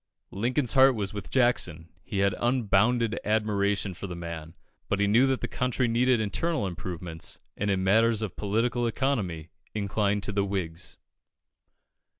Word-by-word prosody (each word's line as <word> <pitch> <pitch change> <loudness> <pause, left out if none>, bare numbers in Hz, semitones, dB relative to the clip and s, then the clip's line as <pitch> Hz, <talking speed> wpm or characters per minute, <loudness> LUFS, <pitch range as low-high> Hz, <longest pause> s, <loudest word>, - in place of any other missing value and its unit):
Lincoln's 120 +5 0
heart 135 -1 +6
was 100 -2 -3
with 105 - -6
Jackson; 90 -11 +1
he 100 -2 -2
had 100 - +2
unbounded 115 -1 +2
admiration 105 -2 0
for 100 - -7
the 90 - -6
man, 85 -2 -7 0.3
but 100 - 0
he 100 - +3
knew 115 +6 +4
that 135 -1 0
the - - -1
country 125 0 0
needed 120 +1 +3
internal 130 +5 -1
improvements, 85 -2 -5 0.2
and 100 - -2
in 95 -1 +1
matters 110 +3 +3
of 100 -7 -4
political 120 +4 0
economy 105 - -2 0.2
inclined 100 0 0
to - - -2
the 100 -1 +1
Whigs. 95 -3 -4
105 Hz, 150 wpm, -27 LUFS, 95-120 Hz, 0.3 s, heart